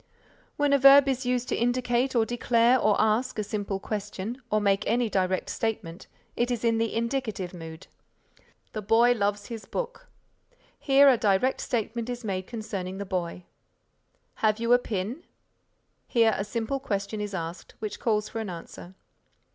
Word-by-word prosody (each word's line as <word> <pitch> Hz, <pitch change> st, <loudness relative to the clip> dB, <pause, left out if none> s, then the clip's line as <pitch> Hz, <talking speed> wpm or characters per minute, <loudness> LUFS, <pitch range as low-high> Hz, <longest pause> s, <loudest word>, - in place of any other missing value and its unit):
When 290 Hz, -2 st, +2 dB
a 280 Hz, -, +5 dB
verb 275 Hz, +1 st, +8 dB
is 260 Hz, -1 st, -1 dB
used 250 Hz, 0 st, 0 dB
to -, -, 0 dB
indicate 245 Hz, +2 st, 0 dB
or 225 Hz, -2 st, +4 dB
declare 240 Hz, +1 st, +3 dB
or 210 Hz, -3 st, +2 dB
ask 220 Hz, +4 st, +1 dB
a 215 Hz, -, 0 dB
simple 200 Hz, -1 st, -3 dB
question 210 Hz, +4 st, -5 dB
or 215 Hz, -, +2 dB
make 200 Hz, 0 st, +2 dB
any 235 Hz, 0 st, +1 dB
direct 185 Hz, -1 st, 0 dB
statement, 195 Hz, -6 st, -4 dB, 0.3 s
it 240 Hz, +1 st, 0 dB
is 240 Hz, -2 st, -2 dB
in 230 Hz, -1 st, +2 dB
the 225 Hz, -1 st, -1 dB
Indicative 230 Hz, -6 st, -2 dB
Mood. 160 Hz, -2 st, -9 dB, 0.9 s
"The 215 Hz, -, -3 dB
boy 225 Hz, +4 st, +4 dB
loves 205 Hz, -3 st, 0 dB
his 230 Hz, -2 st, -7 dB
book." -, -, -5 dB, 0.7 s
Here 275 Hz, 0 st, +5 dB
a 260 Hz, -3 st, +6 dB
direct 210 Hz, +5 st, +2 dB
statement 235 Hz, 0 st, -2 dB
is 245 Hz, 0 st, -5 dB
made 185 Hz, -2 st, -3 dB
concerning 200 Hz, -5 st, -5 dB
the 200 Hz, -, -4 dB
boy. 180 Hz, -2 st, -3 dB, 1.0 s
"Have 215 Hz, 0 st, +2 dB
you 235 Hz, +1 st, +3 dB
a 245 Hz, -, +6 dB
pin?" 225 Hz, -, -4 dB, 0.8 s
Here 230 Hz, -2 st, +3 dB
a 195 Hz, -, -2 dB
simple 230 Hz, +5 st, -2 dB
question 205 Hz, -4 st, -3 dB
is 205 Hz, -2 st, -4 dB
asked 170 Hz, 0 st, -6 dB
which 215 Hz, -2 st, -5 dB
calls 215 Hz, -2 st, 0 dB
for 225 Hz, -, -5 dB
an 215 Hz, -, -5 dB
answer. 175 Hz, +1 st, -9 dB
225 Hz, 165 wpm, -27 LUFS, 200-245 Hz, 1.0 s, verb